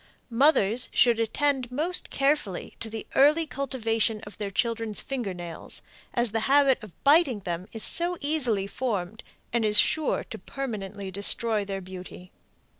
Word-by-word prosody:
Mothers 245 -3 +3
should 235 -2 +4
attend 255 +2 0
most 320 +8 -2
carefully 275 -10 -1
to 225 - -3
the 220 0 -6
early 300 +4 +4
cultivation 225 -6 -1
of 205 -1 -12
their 205 -2 -3
children's 225 +1 -1
finger 250 -7 -3
nails, 175 -2 -6 0.3
as 240 -3 +1
the 225 - 0
habit 275 -2 +4
of 210 -5 -14
biting 285 -6 +4
them 180 0 -4
is 225 - -3
so 350 +1 +3
easily 255 -10 +1
formed 210 -3 -3 0.3
and 235 -1 +1
is 210 -1 +3
sure 310 +8 +3
to - - -6
permanently 200 -7 -6
destroy 210 +2 +2
their 195 -1 -5
beauty. 180 0 -10
230 Hz, 150 wpm, -26 LUFS, 200-275 Hz, 0.3 s, should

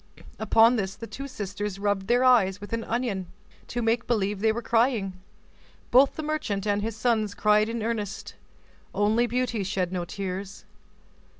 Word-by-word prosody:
Upon 225 +2 +5
this, 195 -2 -2
the 230 - -8
two 275 +4 -7
sisters 205 -4 -5
rubbed 200 -1 -1
their 245 +3 +3
eyes 205 -7 +4
with 205 +2 -9
an 230 0 -1
onion, 225 -6 -2 0.4
to 240 0 -3
make 225 +1 +1
believe 205 -4 0
they 220 +2 +3
were 235 +2 -4
crying; 225 -5 +1 0.8
both 265 +3 +5
the 315 - -4
merchant 295 -11 -2
and 205 -1 +1
his 220 0 -3
sons 220 -3 0
cried 210 +1 +3
in 230 -1 -3
earnest. 215 -3 -3 0.6
Only 215 +4 +2
Beauty 240 -3 -1
shed 185 -2 -1
no 180 -2 -2
tears. 195 +2 -6
215 Hz, 165 wpm, -26 LUFS, 200-235 Hz, 0.8 s, Upon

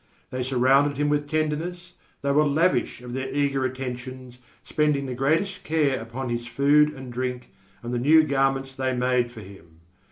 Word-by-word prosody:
They 130 - -3
surrounded 135 +3 +3
him 145 0 +1
with 145 0 0
tenderness, 155 +4 -2 0.3
they 140 - +1
were 150 +2 +4
lavish 150 -5 +1
of 125 -1 -7
their 130 +1 -3
eager 140 -1 0
attentions, 130 -1 -6 0.2
spending 150 -2 0
the 130 - -4
greatest 160 +10 0
care 150 -4 +1
upon 120 +3 -5
his 120 0 -3
food 145 +5 +4
and 130 -2 -9
drink 125 0 -4 0.3
and 120 +1 -4
the 120 - 0
new 155 +5 +6
garments 135 -2 0
they 130 -1 -1
made 125 -1 +1
for 115 -2 -11
him. 85 -5 -15
135 Hz, 170 wpm, -25 LUFS, 125-145 Hz, 0.3 s, new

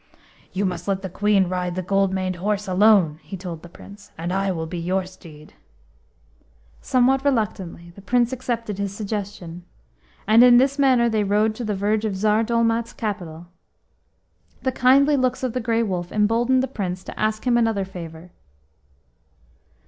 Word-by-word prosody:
OU 200 - +1
must 180 -1 -4
let 195 -1 -1
the 190 - -5
Queen 200 -1 +2
ride 180 -1 -3
the 185 - -3
gold 195 +1 +1
maned 185 -1 -2
horse 205 +2 -2
alone," 185 -5 +4
he 155 +6 -8
told 175 -3 -7
the 175 - -12
Prince, 205 +4 -14
"and 170 +3 -3
I 195 0 0
will 165 -3 -3
be 170 +2 -5
your 185 +2 -1
steed." 160 -5 -14 1.3
Somewhat 265 +1 +2
reluctantly, 195 -10 -2
the 200 - -14
Prince 240 +4 +1
accepted 235 -5 -4
his 200 -1 -2
suggestion, 200 -5 -6 0.6
and 220 +3 +6
in 245 -1 +7
this 275 +3 +2
manner 255 -4 +4
they 220 -2 +1
rode 210 +2 +1
to 240 - -6
the 210 -2 -2
verge 210 +2 0
of 210 -3 -2
Tsar 215 +2 +2
Dolmat's 230 0 0
capital. 175 -7 -5 1.2
The 260 - +1
kindly 275 +4 +4
looks 255 0 0
of 250 -3 -1
the 255 - -1
Grey 230 0 +1
Wolf 180 -4 -3
emboldened 230 +5 +2
the - - -1
Prince 185 -7 -4
to - - -10
ask 215 +1 -1
him 245 -1 +3
another 225 -4 +1
favour. 170 -2 -10
205 Hz, 170 wpm, -22 LUFS, 185-230 Hz, 1.3 s, in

